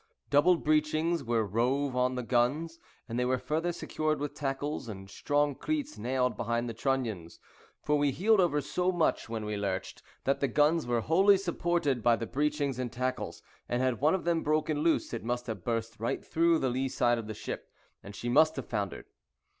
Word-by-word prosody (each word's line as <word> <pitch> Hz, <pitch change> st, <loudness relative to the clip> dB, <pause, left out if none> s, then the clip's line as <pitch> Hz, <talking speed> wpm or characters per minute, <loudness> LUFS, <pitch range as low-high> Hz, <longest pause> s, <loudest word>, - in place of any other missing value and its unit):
Double 170 Hz, +5 st, +5 dB
breechings 155 Hz, +1 st, +1 dB
were 115 Hz, -2 st, +1 dB
rove 125 Hz, +6 st, 0 dB
on 125 Hz, 0 st, +1 dB
the 125 Hz, -, -3 dB
guns, 145 Hz, +8 st, 0 dB, 0.3 s
and 120 Hz, 0 st, -3 dB
they -, -, +2 dB
were 130 Hz, +1 st, +1 dB
further 155 Hz, +7 st, -1 dB
secured 155 Hz, -2 st, -2 dB
with 145 Hz, 0 st, -3 dB
tackles; 140 Hz, -1 st, -3 dB
and 95 Hz, -1 st, -8 dB
strong 145 Hz, +4 st, +1 dB
cleats 300 Hz, -, -3 dB
nailed 125 Hz, 0 st, 0 dB
behind 120 Hz, +1 st, -1 dB
the 115 Hz, -, -4 dB
trunnions; 115 Hz, -9 st, -2 dB, 0.4 s
for 150 Hz, 0 st, +2 dB
we 145 Hz, 0 st, +3 dB
heeled 205 Hz, +9 st, +3 dB
over 150 Hz, -5 st, +3 dB
so 180 Hz, +6 st, 0 dB
much 165 Hz, -8 st, 0 dB
when 110 Hz, -2 st, -3 dB
we 105 Hz, 0 st, -2 dB
lurched, 100 Hz, -2 st, -3 dB, 0.2 s
that 140 Hz, +1 st, +1 dB
the 140 Hz, -, +1 dB
guns 150 Hz, +4 st, +2 dB
were 120 Hz, -1 st, +1 dB
wholly 190 Hz, -, +5 dB
supported 170 Hz, -7 st, 0 dB
by 120 Hz, +1 st, +4 dB
the 115 Hz, -, -4 dB
breechings 145 Hz, 0 st, -1 dB
and 125 Hz, -2 st, -3 dB
tackles, 130 Hz, +1 st, -3 dB, 0.3 s
and 120 Hz, +1 st, 0 dB
had 130 Hz, -2 st, 0 dB
one 155 Hz, +5 st, +4 dB
of 190 Hz, -, -3 dB
them 170 Hz, -1 st, +1 dB
broken 155 Hz, 0 st, 0 dB
loose 160 Hz, -3 st, +1 dB
it 115 Hz, -, -4 dB
must 120 Hz, +1 st, -2 dB
have 110 Hz, -7 st, -5 dB
burst 115 Hz, -1 st, -2 dB
right 115 Hz, -, -2 dB
through 165 Hz, 0 st, +3 dB
the 135 Hz, -, 0 dB
lee 130 Hz, +2 st, -1 dB
side 120 Hz, -2 st, +2 dB
of 110 Hz, -, -7 dB
the 110 Hz, -, -5 dB
ship, -, -, -6 dB, 0.3 s
and 100 Hz, 0 st, -10 dB
she 120 Hz, -, -5 dB
must 155 Hz, +6 st, +4 dB
have 135 Hz, -, -5 dB
foundered. 100 Hz, -4 st, -3 dB
135 Hz, 200 wpm, -30 LUFS, 120-155 Hz, 0.4 s, Double